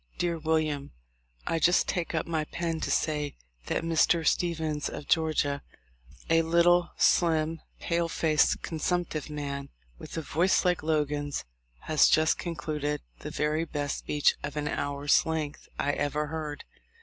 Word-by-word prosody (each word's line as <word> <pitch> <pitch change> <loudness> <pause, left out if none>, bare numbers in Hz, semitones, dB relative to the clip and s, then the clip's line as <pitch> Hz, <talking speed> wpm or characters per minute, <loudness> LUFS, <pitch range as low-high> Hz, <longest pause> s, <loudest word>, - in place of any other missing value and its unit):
"Dear 170 -2 -1
William: 155 -3 0 0.5
"I 165 - 0
just 175 +3 +4
take 175 -3 -2
up 160 - 0
my 160 -2 -1
pen 165 0 -3
to - - -3
say 150 -2 0 0.3
that - - -1
Mr. 165 0 +3
Stephens, 160 -4 0
of 145 - -8
Georgia, 155 -3 +1 0.7
a 165 0 +4
little, 170 +1 +4
slim, 160 -1 +2 0.2
pale 170 0 0
faced, 155 -2 +2
consumptive 160 -1 -2
man, 140 -2 -4 0.3
with - - -8
a 160 - -2
voice 175 +6 +2
like 180 -1 +2
Logan's, 145 -2 -1 0.4
has 155 -2 +4
just 160 0 +3
concluded 150 -3 -3 0.2
the 150 - -6
very 150 +1 0
best 145 -3 -3
speech 150 -1 +2
of 145 +1 -5
an 150 0 -1
hour's 145 0 +1
length 155 -2 -3
I 145 - +1
ever 145 +1 -1
heard. 150 -1 -5
155 Hz, 145 wpm, -28 LUFS, 150-165 Hz, 0.7 s, just